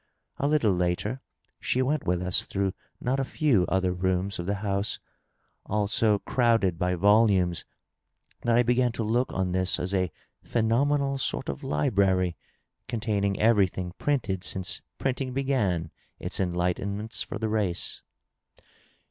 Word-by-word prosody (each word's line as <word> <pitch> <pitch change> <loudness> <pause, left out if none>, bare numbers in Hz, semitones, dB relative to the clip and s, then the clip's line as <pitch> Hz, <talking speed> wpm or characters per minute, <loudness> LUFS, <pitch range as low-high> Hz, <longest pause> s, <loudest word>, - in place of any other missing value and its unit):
A 140 - 0
little 145 -8 +3
later 90 +8 -1 0.4
she 130 - +1
went 145 +3 -1
with 90 0 +1
us 90 0 +1
through 95 -1 -1 0.3
not 130 +2 0
a - - +1
few 130 - +2
other 95 -1 +1
rooms 95 +2 -1
of 85 - -4
the 100 - 0
house, 100 +1 0 0.7
all 105 0 +1
so 105 +1 +3
crowded 115 -7 +1
by 90 0 +1
volumes 100 -2 +3 0.8
that 120 0 +2
I 120 - +5
began 125 +1 +2
to 115 - -2
look 120 +4 +1
on 95 -1 -1
this 95 0 +1
as 95 +2 -2
a 90 -3 +1 0.3
phenomenal 135 +5 +1
sort - - -2
of - - -5
library 95 +2 +1 0.5
containing 105 -4 -1
everything 95 -5 +2
printed 115 -11 0
since 90 -4 -1 0.2
printing 130 -1 -2
b^an 105 - 0 0.3
its - - -4
enlightenments 95 +4 -1
for - - -6
the 110 - -2
race. 100 -5 0
100 Hz, 140 wpm, -27 LUFS, 90-120 Hz, 0.8 s, I